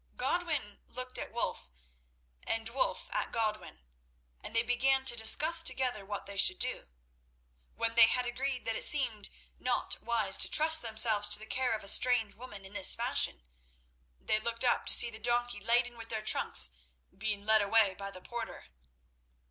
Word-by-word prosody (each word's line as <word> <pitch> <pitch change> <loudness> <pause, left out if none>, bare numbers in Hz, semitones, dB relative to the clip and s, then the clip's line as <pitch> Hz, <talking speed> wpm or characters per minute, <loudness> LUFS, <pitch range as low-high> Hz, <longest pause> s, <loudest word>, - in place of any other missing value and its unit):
Godwin 310 - -3
looked 255 0 -6
at - - -7
Wulf, 235 - -5 0.8
and 225 0 -3
Wulf 275 - -2
at - - -3
Godwin, 215 - -4 0.6
and - - -9
they 230 - +2
began 265 +3 0
to 250 - +5
discuss 305 +9 +5
together 255 -9 0
what 205 +1 -7
they 200 0 -10
should 185 -1 +4
do. - - -3 0.9
When 230 0 -2
they 230 -1 +6
had 250 +2 -1
agreed 255 +1 -5
that 225 - -3
it - - 0
seemed 240 -8 +1 0.3
not - - -3
wise 220 -5 +2
to - - +2
trust 315 +1 +3
themselves 220 -2 +3
to - - +4
the 215 - -11
care 250 +2 -2
of 215 - -8
a - - -6
strange 225 -1 +3
woman 205 -4 -11
in 190 - -11
this 190 - +3
fashion, - - 0 0.8
they 215 - -1
looked 230 +2 -4
up 245 - 0
to - - +4
see 240 -1 +5
the 220 - -9
donkey 240 0 -1
laden 240 +3 0
with 230 -1 -11
their 220 -1 -4
trunks 60 - +4 0.4
being 205 0 -5
led 220 0 +3
away 205 -1 +2
by 195 +1 -7
the 185 -2 -12
porter. 235 -1 -8
230 Hz, 175 wpm, -30 LUFS, 210-250 Hz, 0.9 s, they